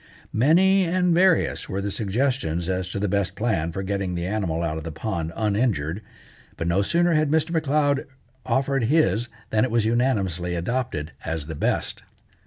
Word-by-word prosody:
Many 185 - +4
and 180 0 +2
various 180 0 +2
were 95 - -2
the 100 +1 -2
suggestions 105 - -1
as 95 0 -1
to 95 - -4
the 100 +1 0
best 100 -1 0
plan 95 -8 0
for 95 +4 -4
getting 95 -2 -2
the 85 0 -2
animal 90 -5 -1
out 80 -1 -2
of - - -9
the 80 - -5
pond 85 0 -3
uninjured, 105 - 0 0.6
but 80 - -3
no 85 +3 +2
sooner 170 +10 +2
had 155 -1 +2
Mr. 160 +2 +1
M'Leod 145 -3 +1 0.4
offered 135 +2 +1
his 120 - +2 0.2
than 110 0 +3
it 130 - +1
was 115 -1 +1
unanimously 100 -8 0
adopted 85 -4 -2
as 80 -2 -3
the 80 - -6
best. 75 - -1
105 Hz, 175 wpm, -24 LUFS, 90-140 Hz, 0.6 s, Many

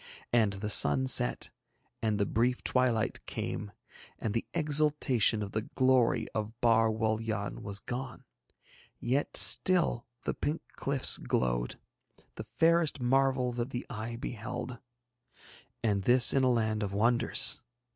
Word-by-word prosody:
And 110 -4 +2
the 100 +2 -5
sun 70 -8 +5
set, - - +2 0.5
and 110 -2 -1
the 100 - +1
brief 120 +5 -1
twilight 125 -4 0
came, 105 -1 -5 0.5
and 110 - -4
the 115 - -3
exultation 150 - +2
of 100 - -7
the 110 - -2
glory 130 +1 +1
of 110 +1 -5
Bar 115 -1 +3
Wul 110 0 -1
Yann 110 -2 -4
was 100 -1 -4
gone, 125 +4 -7 0.8
yet 130 +4 -1
still 170 -11 +2 0.2
the - - -2
pink 155 +3 -4
cliffs 140 -1 0
glowed, - - -2 0.5
the - - -8
fairest 165 -3 +1
marvel 130 0 +1
that 120 +1 -4
the 125 -2 -6
eye 115 0 -6
beheld 120 +1 -6 1.0
and 105 -3 0
this 120 +3 +6
in 135 - +2
a 130 - +3
land 110 -2 -1
of 100 -2 -4
wonders. 120 +3 +3
115 Hz, 135 wpm, -29 LUFS, 110-130 Hz, 1.0 s, this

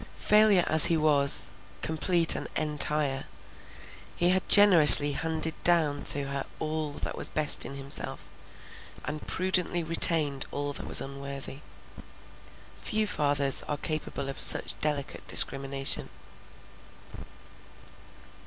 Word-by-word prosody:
Failure 210 -3 0
as 160 -1 +2
he 165 - -2
was, 145 -3 +2 0.4
complete 165 +1 -1
and - - -8
entire, 150 -2 -1 0.9
he 175 +1 -1
had 185 0 -5
generously 165 -8 +8
handed 160 +2 -4
down 155 -5 -1
to 145 - +2
her 140 0 -6
all 155 -1 -7
that - - -8
was - - 0
best 155 -1 0
in 140 - -12
himself, 140 +1 -3 0.8
and 150 0 -10
prudently 180 -2 -3
retained 160 -4 +1
all 145 0 -7
that - - -9
was - - +5
unworthy. 140 0 -11 1.1
Few 215 0 -5
fathers 145 -6 -1
are 145 - -6
capable 155 -2 -7
of 135 - -8
such - - +4
delicate 150 -2 -6
discrimination. 135 0 0
150 Hz, 115 wpm, -24 LUFS, 140-165 Hz, 1.1 s, generously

